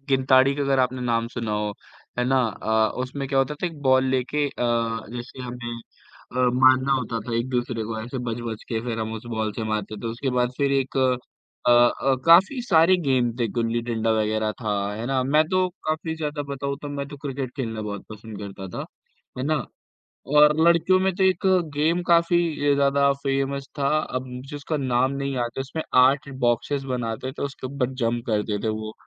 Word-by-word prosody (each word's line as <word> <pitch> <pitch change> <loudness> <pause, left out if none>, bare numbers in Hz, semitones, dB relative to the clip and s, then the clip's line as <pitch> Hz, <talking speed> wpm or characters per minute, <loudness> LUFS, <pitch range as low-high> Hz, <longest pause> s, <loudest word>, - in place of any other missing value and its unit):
गिनताड़ी 130 0 +4
का 145 - -2
अगर 135 -1 +2
आपने 130 0 +1
नाम 115 -2 0
सुना 115 -3 -4
हो, 105 0 -1 0.5
है 125 - +2
ना? 130 +1 +3 0.2
अ, 110 0 +2
उसमें 135 +2 -4
क्या 135 -1 +1
होता 135 +2 +1
था 150 - -3
एक 165 -4 -7
बॉल 130 -1 +4
लेके 130 +3 0
अ, - - -4 0.7
जैसे 125 +2 -8
हमें 120 -1 -6 0.5
अ, - - -8
मारना 130 +2 +4
होता 120 -3 -1
था 115 +2 -5
एक-दूसरे 120 -1 -1
को, 110 0 -4
ऐसे 125 +4 -5
बच-बच 115 -1 -4
के, 115 -2 -1
फिर 115 -1 -4
हम 110 0 -3
उस 110 +1 -8
बॉल 110 -1 -1
से 110 - -4
मारते 110 -1 -3
थे। - - -3
उसके 120 +4 -2
बाद 125 0 +2
फिर 140 -1 +1
एक 135 -1 0
अ 130 -1 +3 0.5
अ, 120 +3 +4
काफ़ी 190 +11 +6
सारे 175 -5 +5
गेम 125 -2 +3
थे, 120 - +2
गुल्ली-डंडा 115 -1 0
वग़ैरह 110 0 0
था, 110 -3 -1 0.2
है 110 +3 -5
ना? 130 0 +1
मैं 145 +4 +4
तो 185 0 +2 0.2
काफ़ी 160 +1 -1
ज़्यादा 150 -2 -3
बताऊँ 140 0 -3
तो 145 - -5
मैं 140 -1 -4
तो 145 - -9
क्रिकेट 135 -2 -3
खेलना 115 -4 -3
बहुत 100 0 -6
पसंद 110 0 -9
करता 100 -1 -7
था, - - -3 0.5
है - - -2
ना? 155 +1 +1 0.8
और 150 0 +7
लड़कियों 170 +2 +4
में 190 0 +1
तो 190 - +1
एक 190 +1 +2 0.3
गेम 160 +4 +1
काफ़ी 170 -3 +3
अ, - - +5
ज़्यादा 140 0 +3
फ़ेमस 135 0 -1
था, 140 - +2
अब 130 -4 -4
मुझे 130 +4 -8
उसका 145 +2 -3
नाम 130 +1 +2
नहीं 140 0 -3
याद 120 -1 -1
है, - - 0
उसमें 135 +4 -5 0.2
8 140 +1 +1 0.2
बॉक्सेज 120 +4 0
बनाते 120 +1 -3
थे, - - -6
उसके 130 -1 -7
ऊपर 130 -1 -2
जंप 120 +1 -1
करते 105 -2 0
थे - - 0
वो, 110 0 -4
130 Hz, 200 wpm, -24 LUFS, 115-140 Hz, 0.8 s, और